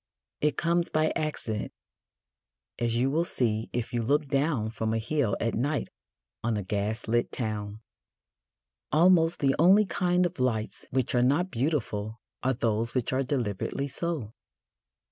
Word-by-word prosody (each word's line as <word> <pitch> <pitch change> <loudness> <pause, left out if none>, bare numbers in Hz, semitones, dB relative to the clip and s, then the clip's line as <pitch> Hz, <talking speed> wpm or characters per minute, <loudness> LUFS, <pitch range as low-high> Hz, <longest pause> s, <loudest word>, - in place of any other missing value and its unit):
It 150 -2 +1
comes 170 0 +1
by 155 0 +2
accident, 115 -9 -3 1.1
as 115 -1 0
you 130 +3 +2
will 160 +4 +2
see 115 -9 0
if 120 -1 -3
you 120 - +1
look 145 +6 +2
down 135 -6 +1
from 110 0 -1
a - - +1
hill 120 -1 0
at 115 -1 0
night 140 +5 -1 0.5
on 115 -1 0
a 105 - -2
gas 105 +4 -2
lit 120 +1 +1
town. 105 -2 -4 1.1
Almost 165 +1 +4
the 135 -1 +3
only 195 +6 +6
kind 180 -1 +1
of 175 -4 -4
lights 115 -4 -1
which 130 0 0
are 125 - +3
not 145 +9 +2
beautiful 115 -5 -2 0.2
are 130 0 +1
those 115 0 -1
which 125 0 0
are 130 - +2
deliberately 130 0 -2
so. 140 -6 -3
125 Hz, 150 wpm, -28 LUFS, 110-155 Hz, 1.1 s, only